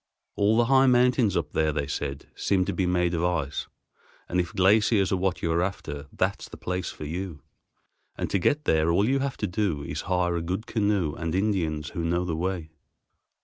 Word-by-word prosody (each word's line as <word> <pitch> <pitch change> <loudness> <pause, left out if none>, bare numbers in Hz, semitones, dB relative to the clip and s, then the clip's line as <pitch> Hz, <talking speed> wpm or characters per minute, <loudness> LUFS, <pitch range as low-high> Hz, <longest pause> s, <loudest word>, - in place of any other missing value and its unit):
All 105 +2 +3
the 120 - +4
high 135 +1 +5
mountains 125 -5 +4
up 75 -3 -2
there, 80 0 +1
they 75 -1 -2
said, 70 -1 -4
seemed 95 -2 +1
to - - -2
be 95 - 0
made 90 -1 +1
of 85 0 0
ice, 80 -5 -1 0.6
and 90 - 0
if 90 0 -1
glaciers 100 +1 +3
"are - - +3
what 95 -1 -1
you 85 - +1
are 85 +1 +2
after, 75 -6 -4
that's - - -2
the - - -10
place 90 0 -3
for 75 - -8
you," 85 -1 -5 0.7
and - - -2
to 100 - +2
get 150 - +1
there 80 - +3
"all 100 +5 +3
you 135 +2 +2
have 135 -1 -2
to - - -1
do 90 -6 -1
is - - -4
to - - -6
hire 90 -2 +1
a 85 - -1
good 95 +6 -3
canoe 100 -8 0
and 85 +1 -3
Indians 85 -8 0
who 85 - -4
know 85 +2 0
the 85 -3 -2
way." 85 -2 -3
90 Hz, 215 wpm, -26 LUFS, 80-100 Hz, 0.7 s, high